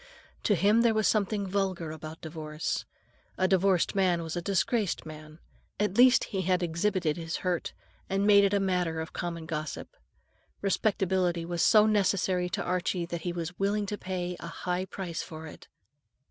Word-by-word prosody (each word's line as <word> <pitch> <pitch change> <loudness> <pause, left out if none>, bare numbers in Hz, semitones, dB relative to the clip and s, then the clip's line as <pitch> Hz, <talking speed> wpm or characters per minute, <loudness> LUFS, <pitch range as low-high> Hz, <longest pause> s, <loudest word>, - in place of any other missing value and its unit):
To 205 - +4
him 205 +6 +4
there 230 -2 +3
was 215 -1 +3
something 210 -1 +1
vulgar 185 -4 -1
about 155 +1 -8
divorce. 155 -1 -4 0.5
A 185 - +2
divorced 190 -1 +2
man 180 -3 +2
was 160 0 -5
a 175 - -2
disgraced 195 +2 0
man; 155 0 -10 0.4
at 210 -2 0
least, 250 +2 +6
he 195 - -3
had 185 0 +1
exhibited 170 -1 0
his 165 -1 -4
hurt, 180 -2 -1 0.4
and 195 +1 +1
made 200 -1 +7
it 200 - +3
a 200 - +2
matter 180 -4 0
for - - -17
common 170 -2 -4
gossip. 155 -3 -5 0.7
Respectability 190 -4 +1
was 170 -1 -2
so 215 -1 +6
necessary 190 -4 +1
to - - -2
Archie 180 0 -1
that 170 0 -5
he 175 - -2
was 175 0 -5
willing 205 +1 +1
to 210 - -3
pay 180 -1 -3
a - - -7
high 180 +2 -3
price 180 -4 -5
for 160 -2 -8
it. 155 - -12
180 Hz, 175 wpm, -29 LUFS, 165-200 Hz, 0.7 s, made